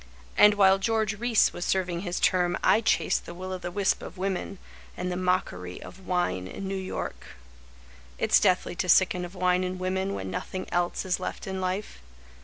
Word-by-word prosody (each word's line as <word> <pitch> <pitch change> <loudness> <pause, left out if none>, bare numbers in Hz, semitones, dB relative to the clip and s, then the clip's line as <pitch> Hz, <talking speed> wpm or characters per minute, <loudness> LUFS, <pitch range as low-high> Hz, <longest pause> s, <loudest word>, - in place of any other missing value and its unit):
And 210 0 +7
while 195 -1 +5
George 215 0 0
Reece 240 -2 +3
was 175 - -5
serving 180 -3 0
his 180 -1 -3
term 175 -1 +2
I 220 - +5
chased 165 -7 +1
the 170 - -8
will 185 +1 -5
o 185 - -4
the 175 - -5
wisp 195 +2 0
of 185 - -9
women 190 +1 -3 0.4
And 180 0 -2
the - - -2
mockery 180 - -1
of 190 0 -12
wine 175 - 0
in 195 - -6
New 195 - -3
York. 190 -1 -4 0.9
It's - - +4
deathly 180 -1 +2
to 185 - -2
sicken 180 0 +4
of 175 +2 -11
wine 180 0 +2
and 185 0 -3
women 190 +1 -1
When 95 0 -5
nothing 185 - -4
else 175 +1 0
is 185 0 0
left 185 - -5
in 190 -1 -4
life. 185 - -3
185 Hz, 195 wpm, -27 LUFS, 180-195 Hz, 0.9 s, And